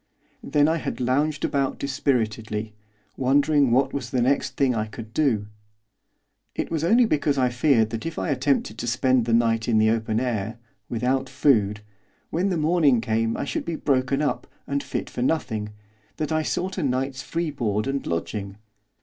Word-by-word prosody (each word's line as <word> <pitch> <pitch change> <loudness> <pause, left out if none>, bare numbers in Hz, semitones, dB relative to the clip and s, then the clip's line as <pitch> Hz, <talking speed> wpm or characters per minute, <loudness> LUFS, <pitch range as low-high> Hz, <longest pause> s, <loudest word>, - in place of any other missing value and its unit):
Then 145 0 +2
I 160 +1 +2
had - - -4
lounged 140 +4 +1
about 140 -2 0
dispiritedly, 110 -6 -1 0.4
wondering 140 +1 +3
what 135 +3 +2
was 125 -4 -4
the 125 - 0
next 135 +3 0
thing 135 -3 +3
I 110 -2 -1
could 110 0 -10
do. 120 -9 +1 1.1
It - - -3
was 160 -2 -1
only 230 +8 +5
because 145 -7 +1
I 130 -1 +3
feared 120 -3 +2
that 115 +7 -4
if 165 - -6
I - - -2
attempted 130 -5 0
to 120 - -3
spend 125 0 +2
the 115 - 0
night 115 -1 +2
in 115 -2 +3
the 110 0 +4
open 110 -1 0
air, 115 -3 -2 0.3
without 130 +3 0
food, 110 -6 +2 0.5
when 180 +4 +1
the 180 - 0
morning 155 -5 +3
came 115 0 0
I - - -2
should - - -3
be 170 - -3
broken 135 -1 +1
up, 145 - -1 0.2
and 140 0 -1
fit - - -4
for - - -5
nothing, 125 -7 -1 0.5
that 155 0 -2
I 155 0 +2
sought 185 +4 -2
a - - -1
night's 130 0 -1
free 165 +1 -2
board 110 -6 -1
and 135 0 -2
lodging. 100 +4 -3
130 Hz, 180 wpm, -24 LUFS, 115-145 Hz, 1.1 s, only